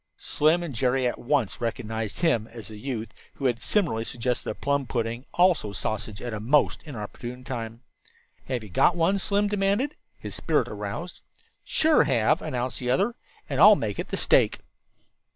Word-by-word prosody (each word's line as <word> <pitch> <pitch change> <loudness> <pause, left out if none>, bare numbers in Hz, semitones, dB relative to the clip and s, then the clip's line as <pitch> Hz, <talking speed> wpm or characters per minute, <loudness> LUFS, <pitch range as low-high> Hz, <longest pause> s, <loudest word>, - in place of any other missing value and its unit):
Slim 160 +4 +2
and 165 -5 -5
Jerry 130 +1 +1
at 120 - -1
once 125 -5 0
recognized 110 -1 -3
him 120 -11 +2
as 115 -1 -10
the 110 - -9
youth 115 -3 -4 0.3
who 140 - -5
had 120 -3 +1
similarly 170 - +1
suggested 125 +1 -2
a - - -3
plum 140 -2 -1
pudding, 115 +1 -3
also 175 - +3
sausage, 105 +1 -4
at 120 -2 -4
a 105 - -3
most 135 +8 +2
inopportune 125 -1 -7
time. 115 -2 -6 0.6
"Have 125 -3 -2
you 105 - -10
got 170 - +4
one?" 175 +4 +2
Slim 205 +1 +1
demanded, 205 +7 0 0.2
his - - -8
spirit - - +1
aroused. - - -6 0.4
"Sure 315 -1 +3
have," 130 +5 +2
announced 130 -4 -3
the 125 - -3
other, 195 - +2 0.3
"and 140 0 -1
I'll 210 +3 +10
make 105 - -3
it - - -3
the - - -3
stake." - - +3
125 Hz, 170 wpm, -26 LUFS, 115-165 Hz, 0.6 s, I'll